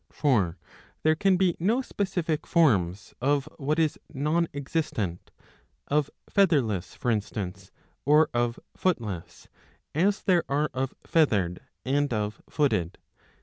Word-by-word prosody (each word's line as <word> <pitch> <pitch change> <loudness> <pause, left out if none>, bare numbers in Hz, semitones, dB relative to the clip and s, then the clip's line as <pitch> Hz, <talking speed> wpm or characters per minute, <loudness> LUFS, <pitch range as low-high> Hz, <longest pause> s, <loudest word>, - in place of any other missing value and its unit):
For 100 - +1 0.5
there 155 - +5
can 185 +3 +3
be 180 -2 +2
no 225 +9 +2
specific 175 -8 -2
forms 100 - +2
of 140 +1 +1
what 150 +2 -1
is 160 -2 +1
non 155 +4 +1
existent, 140 - -3 0.6
of 145 -1 +2 0.2
Featherless 130 - +2
for 120 - 0
instance 100 -3 -3 0.3
or 150 +4 +5
of 120 0 0 0.2
Footless, 110 - -2 0.5
as 195 +6 +2
there 180 -3 +3
are 145 +1 +1
of 130 +1 -2
Feathered 100 - +2 0.3
and 145 +2 +1
of 105 -1 -2
Footed. 105 - 0
140 Hz, 120 wpm, -27 LUFS, 105-160 Hz, 0.6 s, there